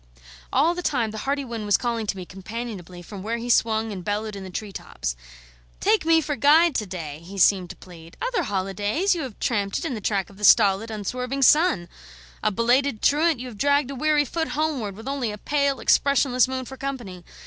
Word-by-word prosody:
All 305 +6 +3
the 355 - -4
time 245 -10 0
the 220 - -6
hearty 280 0 0
wind 230 -3 -5
was 205 - +4
calling 235 -3 -2
to 195 - -2
me 185 - -6
companionably 190 -2 -7
from 195 +2 -9
where 225 +4 -2
he 240 +1 -2
swung 220 -1 +2
and 185 -3 -6
bellowed 210 +1 -3
in 195 - -7
the 190 - -8
tree 205 +3 -5
tops. - - -5 0.6
"Take 220 +8 +2
me 325 0 +5
for 295 -1 -2
guide 310 +4 +5
to 215 - -3
day," 160 -5 -6
he 195 +3 -10
seemed 185 -1 +4
to - - -8
plead. 170 -2 -14
"Other - - -1
holidays 205 - 0
you 340 - -3
have 255 -7 -7
tramped 200 -4 0
it - - -4
in 285 - -2
the 220 - -5
track 200 -2 -1
of 195 - -17
the 210 - -11
stolid, 205 0 +5
unswerving 250 +6 -3
sun; 295 - +4 0.5
a - - +2
belated 240 +3 +1
truant, 305 -1 +3
you 255 - -6
have 220 -5 -10
dragged 285 -1 +2
a - - -6
weary 300 +2 +2
foot 320 +4 -2
homeward 275 -11 -1
with 225 +5 -10
only 270 -5 -2
a 210 - -7
pale, 280 +3 0
expressionless 270 -3 +3
moon 260 0 -4
for 265 +2 -9
company. 240 -11 -6
230 Hz, 215 wpm, -24 LUFS, 200-280 Hz, 0.6 s, me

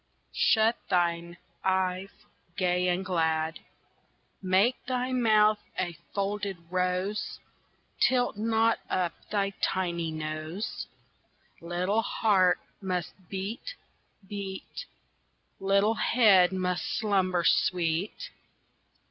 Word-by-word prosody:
Shut 225 0 +4
thine 170 -1 0 0.3
eyes 190 0 0 0.5
gay 180 -1 +1
and 180 +1 0
glad; 160 -3 0 0.8
Make 195 +6 +2
thy 255 0 -1
mouth 215 -4 +4 0.2
a 175 -2 -1 0.2
folded 200 -1 -2
rose, 185 +3 -1 0.6
Tilt 245 -3 +3
not 225 +1 +2
up 180 -2 0 0.2
thy 200 -1 0
tiny 170 -3 0
nose! 155 +5 -4 0.7
Little 180 +6 0
heart 190 -5 +3 0.2
must 180 -3 -2 0.2
beat, 210 - -5 0.5
beat, 195 -2 -6 0.7
Little 200 +3 +3
head 205 -6 +5
must 180 -1 -1
slumber 190 -5 +1
sweet. 170 +3 +1
190 Hz, 90 wpm, -28 LUFS, 180-210 Hz, 0.8 s, head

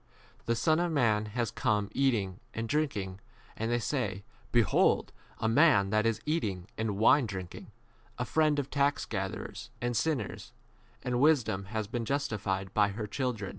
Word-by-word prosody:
The 115 - +2
Son 155 +7 +2
of 175 -1 0
man 110 -8 +2
has 120 -4 0
come 105 -1 0
eating 110 -9 0 0.2
and 115 0 -2
drinking, 105 -11 -1 0.4
and 115 +2 -2
ye 120 - +3
say, 110 -6 -2 0.3
Behold 120 -4 +3 0.3
an 110 - +1 0.7
eater 105 - -1
and 110 -3 -2
wine 120 +4 +5
drinker, 95 -3 -7 0.5
a - - -2
friend 155 -2 +2
85 145 - 0
of 140 - -26
tax 140 0 +1
gatherers - - -5
and 120 0 -1
sinners; 140 -6 -2 0.5
and 125 -1 0
wisdom 125 -10 +3
has 110 +1 -3
been 115 +2 -3
justified 105 -8 -1
of - - -18
all 105 - +7
89 100 - -3
her 110 - -2
children. 110 -3 -3
115 Hz, 160 wpm, -30 LUFS, 100-140 Hz, 0.7 s, all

